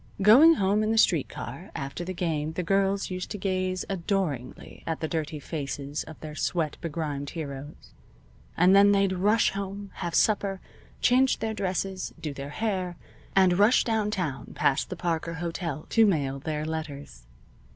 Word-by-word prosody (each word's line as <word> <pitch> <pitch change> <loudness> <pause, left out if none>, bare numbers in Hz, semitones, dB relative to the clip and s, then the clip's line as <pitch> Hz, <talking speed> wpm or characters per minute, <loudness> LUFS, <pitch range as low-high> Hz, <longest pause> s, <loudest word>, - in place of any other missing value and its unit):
Going 280 +11 +8
home 200 -2 +2
in 215 - 0
the 225 - +1
street 170 -9 +3
car 140 +11 -7
after 140 +5 -4
the 180 - -4
game 160 -3 -1
the 180 - -2
girls 195 +2 +1
used 185 0 -4
to 205 - -4
gaze 185 -1 -1
adoringly 175 - -3
at 165 -1 -2
the 160 - -2
dirty 155 -1 -3
faces 145 -1 -4
of 160 - -11
their 155 -1 -7
sweat 155 0 -1
begrimed 150 -4 -3
heroes, 145 -2 -8 0.6
and 180 +3 +6
then 200 +1 +7
they'd 195 -1 +2
rush 205 +5 +3
home, 200 0 -5
have 170 -2 -3
supper, 200 -3 +2 0.4
change 255 +1 +4
their 220 0 -2
dresses, 190 -1 -3
do 150 -3 -4
their 140 0 -7
hair, 185 -1 -2 0.4
and 185 -1 +4
rush 210 +5 +5
downtown 205 - -2
past 135 - +1
the 185 - -4
Parker 170 -1 -2
Hotel 165 -3 -4
to 225 -1 +5
mail 140 -7 0
their 150 +1 -3
letters. 145 - -6
175 Hz, 160 wpm, -27 LUFS, 150-195 Hz, 0.6 s, Going